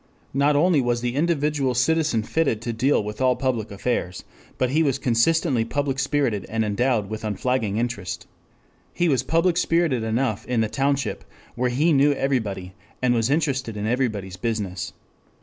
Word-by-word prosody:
Not 140 +2 +3
only 155 0 +4
was 120 -1 0
the 120 0 -1
individual 145 -3 +1
citizen 150 -3 +2
fitted 140 -3 0
to 120 - -2
deal 125 +1 +2
with 105 +3 -6
all 130 -1 +3
public 120 -5 -1
affairs, 100 -3 -2 0.3
but 130 -1 0
he 155 +3 +3
was 140 -4 +2
consistently 130 +1 +2
public 140 +3 -2
spirited 130 - 0
and 110 0 0
endowed 110 0 +1
with 110 +1 -6
unflagging 110 0 -1
interest. 115 -6 -3 0.7
He 175 - +2
was 135 -6 +2
public 165 +5 +1
spirited 165 -8 +2
enough 110 -1 -1
in 125 -2 +1
the 110 - 0
township, 135 -5 -1 0.3
where 125 +1 0
he 150 +7 +2
knew 145 +1 +4
everybody 105 -10 -2 0.3
and 125 -1 +2
was 115 0 +1
interested 135 -7 0
in 105 - -3
everybody's 110 -6 -1
business. 100 -3 -3
125 Hz, 165 wpm, -23 LUFS, 110-140 Hz, 0.7 s, only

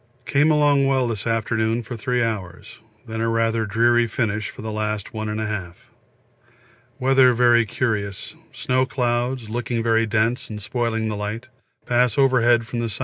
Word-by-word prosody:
Came 145 +3 +3
along 145 -2 +3
well 130 -2 +1
this 115 -1 -4
afternoon 115 +1 0
for 120 +2 -7
three 120 +2 -1
hours, 100 -6 -5 0.3
then 110 -1 -5
a 115 - 0
rather 115 -1 0
dreary 120 +3 +3
finish 105 -3 -2
for 105 - -10
the 110 - -4
last 105 -1 -3
1 110 -1 -4
1/2. 105 -5 -4 1.2
Weather 130 -1 +4
very 120 -1 +4
curious, 105 -4 -3 0.2
snow 130 0 0
clouds, 120 -1 -1
looking 120 0 -2
very 115 0 +2
dense 110 +3 0
and 105 -1 -6
spoiling 115 0 -2
the 110 - -3
light, 105 +5 -5 0.4
pass 125 +2 +1
overhead 120 -4 +3
from 120 +1 -5
the 120 - -1
S. 110 -1 -5
115 Hz, 160 wpm, -22 LUFS, 110-125 Hz, 1.2 s, Weather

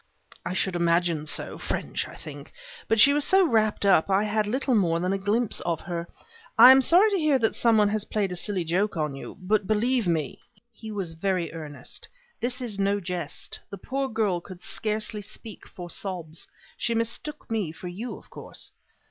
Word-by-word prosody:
"I - - -3
should 190 -1 0
imagine 170 -2 +1
so: - - -2
French, - - -3
I - - -11
think. - - -10 0.4
But 225 - +2
she 280 +7 +8
was 295 0 +2
so 385 +3 +5
wrapped 215 -7 +1
up 195 -3 +4
I 195 +1 +3
had 215 0 0
little 260 +4 0
more 170 -7 +2
than 180 +2 0
a - - +1
glimpse 210 +4 0
of 170 -2 -2
her. 170 -2 -4 0.5
I 255 - +11
am 265 0 +7
sorry 365 - +5
to 395 - +1
hear 305 -4 +3
that 225 -3 +1
some 230 -2 +3
one 210 -1 +4
has 215 0 0
played 205 -3 -1
a - - -3
silly 185 0 +1
joke 180 +4 0
on 150 -2 -1
you, 135 - -9
but 195 +1 0
believe 230 +1 +1
me 160 -5 -1 0.2
" - - -29
he 220 0 -9
was 190 -6 -4
very 175 -1 -1
earnest 155 -3 -7 0.3
"this 250 +2 -1
is 220 -5 -4
no 200 +1 +2
jest. 180 -2 -5
The 200 - -7
poor 270 +7 -3
girl 210 -6 0
could 185 0 -11
scarcely 215 0 -2
speak 210 +1 -10
for 175 -1 -9
sobs. 170 -3 -5 0.3
She 230 +2 0
mistook 230 +5 -3
me 210 -8 -1
for 170 +3 -9
you, 205 +8 -5
of - - -18
course." - - -9
205 Hz, 200 wpm, -26 LUFS, 175-225 Hz, 0.5 s, I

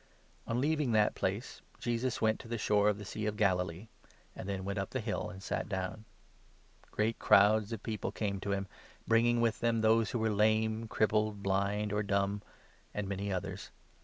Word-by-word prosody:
Jesus - - -4
^n 120 - +1
leaving 150 -3 +1
that 105 -1 +4
place, - - -3 0.2
Jesus 120 +1 -1
went 110 -1 +2
to - - -10
the 115 0 -3
shore 105 -1 +2
29 - - +5
cures'many - - +7
of - - -11
the 105 - -8
Sea 105 +2 -4
of 105 0 -2
Galilee; 90 -1 0 0.5
and 95 - -6
then 95 -1 -3
went 100 +1 -2
up 95 - -3
the 130 - -2
hill, 110 -2 -2
Persons. 95 -2 -8
ancj - - -1
sa^ - - -14
down. 95 +2 -3 0.8
Great 110 +2 -1
crowds 105 +2 +5
of 115 -2 -5
people 110 -2 -3
came 100 -2 -2
30 - - -7
to 100 - -2
him, 100 0 -2 0.4
bringing 120 +1 +4
with 115 -2 +1
them 115 -1 +1
those 110 -1 +4
who - - -1
were 110 -1 +1
lame, 110 +2 +2
crippled, 110 -1 +1
blind, 100 +2 0
or 105 - +1
dumb, 100 0 0 0.5
and 105 -1 -2
many 100 +1 -3
others. 90 -1 -4
105 Hz, 210 wpm, -32 LUFS, 100-110 Hz, 0.8 s, cures'many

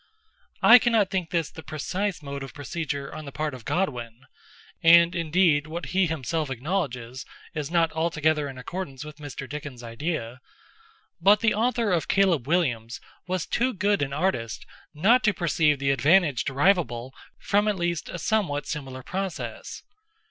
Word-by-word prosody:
I 250 - +10
cannot 225 -5 +2
think 185 -4 -1
this 165 -4 -1
the 160 - -10
precise 180 +4 -3
mode 140 0 -6
of 135 - -8
procedure 145 -1 -4
on 155 - -7
the 140 - -7
part 150 +1 -3
of 125 -3 -10
Godwin—and 165 - +1
indeed 165 -3 +2
what 170 +3 -5
he 190 -1 +3
himself 155 0 -2
acknowledges, 130 -4 -3 0.3
is 150 -2 -4
not 170 -1 +2
altogether 155 -2 0
in 130 - -9
accordance 140 0 -6
with 150 0 -10
Mr. 145 -2 -7
Dickens' 145 -4 -7
idea—but 170 - -2
the 230 -2 +3
author 230 -1 +1
of 170 -3 0
Caleb 180 -10 +2
Williams 120 -9 0 0.3
was 185 -2 -1
too 250 +1 0
good 205 -1 +1
an 140 -1 -1
artist 140 - -2 0.3
not 215 +10 +4
to 210 -2 +2
perceive 155 -3 +2
the 135 0 +1
advantage 150 -1 +3
derivable 135 -5 +1 0.2
from 205 +1 +1
at 210 -2 +1
least 170 -2 -2
a - - -5
somewhat 175 -7 0
similar 135 -4 -6
process. 190 +2 -5
160 Hz, 150 wpm, -26 LUFS, 140-190 Hz, 0.3 s, I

